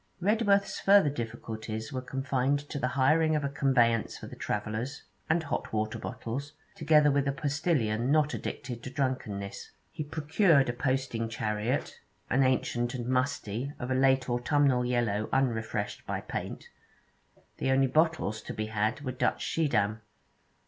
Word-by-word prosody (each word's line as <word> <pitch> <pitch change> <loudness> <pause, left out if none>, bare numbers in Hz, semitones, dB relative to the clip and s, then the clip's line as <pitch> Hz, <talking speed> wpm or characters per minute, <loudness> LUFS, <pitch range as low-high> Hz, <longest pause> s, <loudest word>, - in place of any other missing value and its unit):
Redworth's 200 +1 +2
further 195 -7 +5
difficulties 110 -2 -5
were 130 - -2
confined 135 +1 0
to 145 - -4
the 125 - 0
hiring 155 +4 +4
of 150 - 0
a 140 - 0
conveyance 125 -5 +2
for - - -9
the - - -9
travellers, 110 +7 -3 0.3
and 160 +1 +2
hot 150 - -3
water 110 0 -1
bottles, 140 +6 -5 0.2
together 150 -2 +4
with 140 0 +1
a - - +2
postillion 140 -6 0
not 150 0 +3
addicted 120 -3 -5
to 130 - -6
drunkenness. 130 -8 -3 0.2
He 155 - -4
procured 150 - +3
a - - 0
posting 130 -3 -1
chariot, 110 +4 -2 0.3
an 130 - +4
ancient 125 -2 +1
and 120 -2 -4
musty, 125 0 -1
of 125 +1 -4
a - - +3
late 130 0 +3
autumnal 125 +1 +2
yellow 120 -4 0
unrefreshed 110 -5 -1
by - - -2
paint; - - -6 0.9
the - - 0
only 135 0 +4
bottles 155 -7 +1
to - - -7
be 110 - -2
had 110 +3 -1
were 130 -3 -3
Dutch 125 - 0
Schiedam. 110 -9 +1
130 Hz, 150 wpm, -29 LUFS, 115-145 Hz, 0.9 s, further